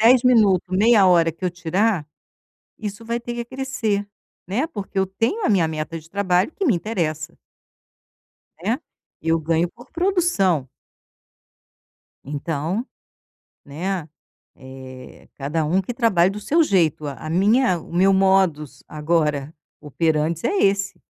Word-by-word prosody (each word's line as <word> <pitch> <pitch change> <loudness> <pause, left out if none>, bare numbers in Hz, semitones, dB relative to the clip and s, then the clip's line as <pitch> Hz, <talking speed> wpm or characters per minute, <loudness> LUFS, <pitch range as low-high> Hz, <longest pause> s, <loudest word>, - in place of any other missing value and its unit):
10 240 +2 +6
minuto, 200 -7 +4
meia 210 +2 +5
hora 170 -3 +4
que 175 +3 -9
eu 180 - +1
tirar, 175 0 0 0.7
isso 210 0 -6
vai 235 +1 -2
ter 240 0 -6
que 240 - -3
acrescer, 235 -5 -2 0.4
né, 230 +10 0
porque 205 -9 -7
eu 190 - +3
tenho 225 - -1
a - - +2
minha 185 -6 +3
meta 160 +1 -4
de 160 +1 -19
trabalho 185 - +1
que 395 - -2
me 260 - +4
interessa. 165 -5 -3 1.3
Né, 225 +7 0 0.4
eu 165 +1 +2
ganho 165 +2 0
por 245 +5 -17
produção. 335 - +1 1.6
Então, 160 - -3 0.8
né, 170 +3 -4 0.5
eh, 130 -1 -12
cada 150 +3 -2
um 175 +5 +2
que 215 +6 -5
trabalhe 195 -7 +3
do 205 +1 -6
seu 325 +10 +2
jeito, 170 - +1
a 140 - -4
a - - -4
minha 200 +3 +3
o - - -14
meu 190 +3 +4
modus 190 -8 +2
agora 150 -1 -1 0.3
operantes 155 +2 -1
é 400 - +1
esse, 195 - +1
185 Hz, 140 wpm, -22 LUFS, 160-225 Hz, 1.6 s, 10